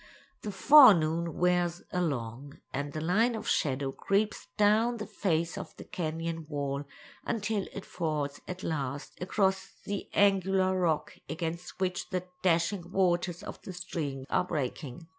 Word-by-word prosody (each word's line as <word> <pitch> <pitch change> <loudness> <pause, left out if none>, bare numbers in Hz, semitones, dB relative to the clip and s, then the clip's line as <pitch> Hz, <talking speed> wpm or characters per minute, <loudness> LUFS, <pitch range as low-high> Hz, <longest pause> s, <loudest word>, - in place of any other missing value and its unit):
The 210 - -4
forenoon 175 - +6
wears 175 -1 +1
along, 140 -5 -3 0.2
and 145 +1 -2
the 155 - -4
line 220 +9 +2
of 220 - -6
shadow 135 -1 +1
creeps 200 +8 0
down 220 +3 +4
the 210 - -4
face 170 -5 -1
of - - -9
the - - -8
canyon 165 -1 -4
wall 140 -1 -2 0.4
until 215 -3 -1
it 200 - -7
falls 150 -4 -2
at 180 0 -6
last 140 -3 -3
across 190 +1 0
the 200 -1 -4
angular 190 -1 +3
rock 170 -4 0
against 170 +2 -4
which 185 -1 -1
the 185 -1 -2 0.2
dashing 175 +1 +1
waters 175 -2 +1
of - - -8
the 190 - -8
stream 150 -7 -4
are - - +3
breaking. 145 -2 -4
175 Hz, 140 wpm, -30 LUFS, 155-190 Hz, 0.4 s, forenoon